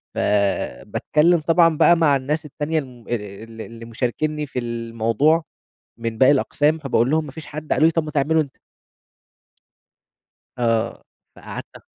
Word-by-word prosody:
فباتكلم 125 - +1
طبعًا 165 0 +3
بقى 170 - +6
مع 150 -4 +4
الناس 150 +4 -2
التانية 150 +2 -2
الم 125 -4 -10
ال 110 0 -6
اللي 115 0 -9
مشاركيني 150 +6 -2
في 130 - -4
ال 115 -1 -4
الموضوع 115 +9 +2 0.5
من 115 -1 -4
باقي 130 +2 +6
الأقسام 150 +3 +1
فباقول 130 -3 +1
لهم 160 0 +2
ما 140 - -9
فيش 155 -1 -9
حد، 155 +1 -5
قالوا 155 - +4
لي 165 - +3
طب 165 -1 0
ما 150 - -5
تعمله 155 +2 +2
أنت. 140 -3 -5 2.0
آه، 115 -2 0 0.3
فقعدت - - -8
أ - - -12
140 Hz, 150 wpm, -22 LUFS, 115-155 Hz, 2.0 s, بقى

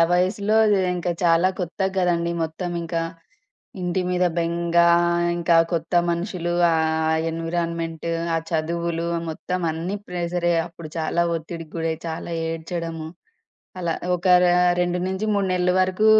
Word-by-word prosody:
వయసులో 200 +4 +2 0.4
ఇంకా 175 0 -1
చాలా 170 +2 +4
కొత్తగదండీ! 180 -1 0
మొత్తం 160 +3 -3
ఇంకా. 165 0 -2 0.8
ఇంటి 180 +1 0
మీద 180 0 +2
బెంగా, 170 0 +2 0.5
ఇంకా 170 0 +3 0.2
కొత్త 165 0 -2 0.2
మనుషులు, 175 0 -2 0.2
ఆ - - +3 0.6
ఎన్విరాన్‌మెంట్, 165 0 -3 0.3
ఆ - - +2
చదువులు 170 +1 -1 0.2
మొత్తం 180 +3 -3
అన్నీ 170 +5 -3
ప్రెషరే 175 -1 0
అప్పుడు 170 -2 -10
చాలా 165 +2 +1
ఒత్తిడికి 165 0 -8
గురై 165 0 -1
చాలా 165 +1 -5 0.2
ఏడ్చడము. 165 -1 -4 0.7
అలా 170 -2 -1 0.2
ఒక 175 +2 -6 0.2
ర - - +5 0.4
2 175 0 0
నుంచి 190 +3 -2
3 200 -1 +1
నెలలు 180 0 +2
వరకు 185 +3 +2
170 Hz, 120 wpm, -23 LUFS, 165-180 Hz, 0.8 s, ర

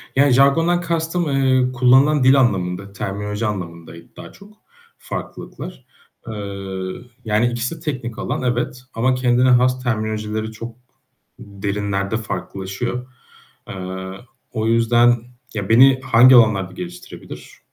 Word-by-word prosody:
Ya, 140 0 +4
jargondan 165 +7 +3
kastım, 170 0 -1
eee, 130 -2 +2
kullanılan 130 +3 +4
dil 135 +2 +6
anlamında, 100 -4 0
terminoloji 105 +3 -4
anlamındaydı 85 -4 -7
daha - - -11
çok 205 +1 -17 0.4
farklılıklar. - - -8 0.4
Eee, 100 -3 -5 0.3
yani, 110 +2 +2
ikisi 120 +6 -3
de - - -14
teknik 130 -8 -5
alan, - - -3
evet. 125 0 -2
Ama 130 +3 +1
kendine 125 0 +2
has 125 +1 +3
terminolojileri 110 -1 -2
çok 115 +1 -8 0.6
derinlerde 100 +1 -3
farklılaşıyor. 110 +3 -5 0.6
Eee, 95 0 -6 0.4
o 110 -1 -1
yüzden, 120 +1 +4 0.4
ya, 100 -2 -4
beni 130 +3 +6
hangi 125 +1 +6
alanlarda 100 -6 +4
geliştirebilir? 90 -1 -10
115 Hz, 115 wpm, -20 LUFS, 100-130 Hz, 0.6 s, dil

